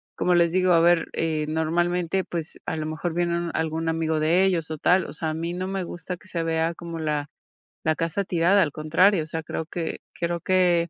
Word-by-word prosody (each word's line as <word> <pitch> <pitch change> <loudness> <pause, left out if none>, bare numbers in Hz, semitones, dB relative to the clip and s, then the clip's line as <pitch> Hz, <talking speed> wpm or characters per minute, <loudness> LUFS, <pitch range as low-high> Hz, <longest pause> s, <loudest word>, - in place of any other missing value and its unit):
como 180 - +2
les 170 -1 +4
digo, 185 +1 +3
a 165 - +6
ver, 170 0 +4
eh, 155 -2 -1
normalmente, 175 +3 0
pues, 165 -2 -6
a 180 - -2
lo 155 -1 -3
mejor 160 +2 -3
viene 170 0 0
algún 160 0 -1
amigo 160 -1 0
de 165 +5 +3
ellos 170 -4 0
o 155 - -3
tal, 185 +5 +3
o - - -8
sea, 160 0 -3
a - - -2
mí 170 +2 -3
no 185 +1 -3
me 190 -1 -2
gusta 175 +1 -6
que 185 - -20
se 170 -2 -2
vea 165 +1 0
como 170 0 -7
la 150 -2 -2 0.5
la 160 0 +2
casa 165 +5 -1
tirada, 180 +3 +3
al 155 - +1
contrario, 165 +4 +3
o - - -10
sea, 160 0 -3
creo 160 - -4
que 165 0 -4
creo 170 0 -2
que, 175 -1 +2
170 Hz, 225 wpm, -25 LUFS, 160-175 Hz, 0.5 s, a